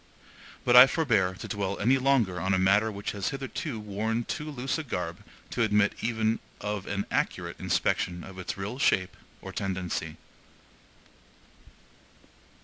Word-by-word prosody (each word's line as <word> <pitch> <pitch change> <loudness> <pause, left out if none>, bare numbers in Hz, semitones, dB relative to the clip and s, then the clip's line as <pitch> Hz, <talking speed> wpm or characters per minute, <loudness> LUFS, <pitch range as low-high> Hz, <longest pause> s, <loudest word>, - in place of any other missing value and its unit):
But 125 - +4
I 125 +2 +12
forbear 110 - +1
to - - -8
dwell 100 -1 -2
any 125 +6 +3
longer 125 -9 +2
on 95 +1 +2
a - - +2
matter 100 +4 +3
which 100 0 -4
has 100 -2 -2
hitherto 135 -2 -4
worn 105 +3 -2
too 150 +5 -4
loose 135 +1 -2
a - - -3
garb 90 - -4 0.3
to - - -1
admit 105 -2 +3
even 110 -1 0 0.2
of 105 -2 -4
an 100 0 -2
accurate - - -1
inspection 85 -1 0
of 95 -1 -10
its 95 - -4
real 105 +7 -5
shape 95 -8 +2 0.3
or - - -6
tendency. 95 -3 -3
105 Hz, 145 wpm, -28 LUFS, 95-125 Hz, 0.3 s, I